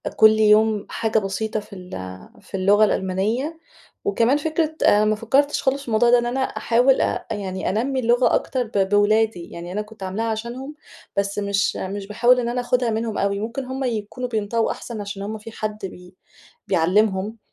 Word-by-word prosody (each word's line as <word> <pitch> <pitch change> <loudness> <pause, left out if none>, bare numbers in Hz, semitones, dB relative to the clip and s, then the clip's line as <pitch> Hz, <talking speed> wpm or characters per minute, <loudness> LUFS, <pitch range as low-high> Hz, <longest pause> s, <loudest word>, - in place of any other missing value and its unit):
كل 220 - +8
يوم 215 0 +4
حاجة 220 0 0
بسيطة 215 +2 -2
في 205 - -13
ال 180 -2 -10 0.5
في - - -9
اللغة 205 +3 +5
الألمانية. 215 - -1 0.5
وكمان 275 - +2
فكرة 315 +1 -1
آآ، 210 +1 +5
ما 215 0 +2
فكّرتش 270 +7 +1
خالص 275 +1 +1
في 275 - -13
الموضوع 230 +1 +3
ده، 245 0 +6
إن 240 - -2
أنا 245 +2 -2
أحاول 255 0 +2
أ - - -1
يعني 190 -3 -3
أنَمّي 260 +6 0
اللغة 240 +1 +3
أكتر 255 -2 -1
ب 200 -4 -1
بولادِي، 205 -2 +2
يعني 170 +1 -8
أنا 205 +3 -2
كنت 210 -1 -11
عاملاها 190 +4 -2
عشانهم، 235 +6 -5 0.4
بس 200 0 0
مش 200 0 0
مش 195 +1 -5
باحاول 240 +4 +3
إن 235 -1 -1
أنا 250 +1 -1
آخدها 245 0 +1
منهم 225 0 -2
أوي، 200 0 0
ممكن 235 +5 -4
هم 260 +1 -4
يكونوا 240 +1 -3
بينطقوا 225 0 0
أحسن، 230 -3 -6
عشان 200 -1 -6
هم 215 +2 -4
في 220 +2 -10
حد 215 -1 -4
بي 180 -1 -11 0.5
بيعلّمهم. 195 +4 +1
220 Hz, 180 wpm, -22 LUFS, 200-245 Hz, 0.5 s, كل